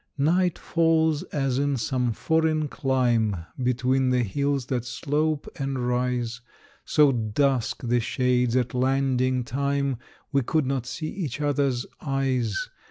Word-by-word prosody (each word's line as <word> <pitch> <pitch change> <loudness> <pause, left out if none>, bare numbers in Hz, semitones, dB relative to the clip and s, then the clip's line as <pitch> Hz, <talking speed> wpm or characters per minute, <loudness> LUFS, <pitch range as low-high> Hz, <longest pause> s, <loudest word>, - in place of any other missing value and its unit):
Night 175 +4 +2
falls 160 -2 +2
as 135 -3 0
in 140 -1 +1
some 125 +1 0
foreign 155 +5 +1
clime, 120 - +1 0.2
Between 130 +1 +1
the 125 -1 +2
hills 140 +5 -1
that 125 -2 -2
slope 150 +4 -1
and 135 -1 -2
rise. 125 -1 -1 0.4
So 150 -2 +4
dusk 125 +2 0
the 120 0 +2
shades 125 0 +1
at 125 -2 +1
landing 130 -1 +1
time, 140 +1 -1 0.3
We 140 -1 +3
could 155 +4 0
not 130 -2 -2
see 155 +3 -4
each 155 -8 -4
other's 140 -4 0 0.2
eyes. 130 -6 -1
130 Hz, 130 wpm, -25 LUFS, 125-145 Hz, 0.4 s, So